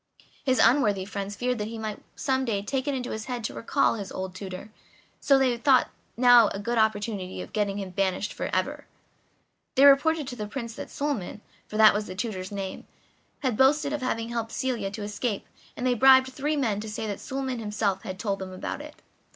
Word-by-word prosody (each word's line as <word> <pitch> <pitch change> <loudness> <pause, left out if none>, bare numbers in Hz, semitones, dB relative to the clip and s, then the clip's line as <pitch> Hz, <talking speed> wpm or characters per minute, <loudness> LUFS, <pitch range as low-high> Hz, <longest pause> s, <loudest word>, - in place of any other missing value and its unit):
His 260 -2 +2
unworthy 210 -8 +4
friends 200 0 -5
feared 250 0 -1
that 210 - -2
he 225 +1 -6
might 215 -1 -5
some 265 -2 0
day 210 -5 -1
take 265 +5 -2
it 285 - 0
into 250 -1 -4
his 220 0 -4
head 245 -2 -4
to - - -3
recall 275 +5 +1
his 205 -4 -6
old 190 0 -5
tutor, 185 +2 -8 0.5
so 275 - +4
they 260 -2 +2
thought 260 +1 +4 0.2
they 245 - -4
now 245 -3 +8
had - - -4
a - - -4
good 235 +3 -1
opportunity 205 -3 -1
of - - -8
getting 205 -2 0
him 195 -2 -5
banished 190 +2 -1
for - - -4
ever. - - -2 0.9
They 275 +1 +6
reported 290 +2 +5
to 250 - -6
the 210 -3 -5
Prince 235 0 -5
that - - -8
Suliman, 280 -9 -3 0.3
for 215 - -5
that 220 0 +8
was 210 +1 -2
the 185 - -7
tutor's 190 -3 -4
name, 195 -2 -5 0.5
had 260 -5 0
boasted 280 +4 +3
of 295 - -2
having 230 -3 -2
helped 230 -1 -3
Celia 245 -6 -1
to 210 +1 -6
escape, 205 +1 -3 0.3
and 250 - -3
they 255 - +3
bribed 260 +1 +6
three 295 +3 -1
men 225 -7 0
to 215 +1 -6
say 220 +1 -4
that 205 -2 -4
Suliman 265 -2 -3
himself 210 -3 -1
had 185 0 -6
told 200 0 -2
them 190 -1 -6
about 185 - -5
it. 300 0 -12
225 Hz, 215 wpm, -27 LUFS, 205-260 Hz, 0.9 s, now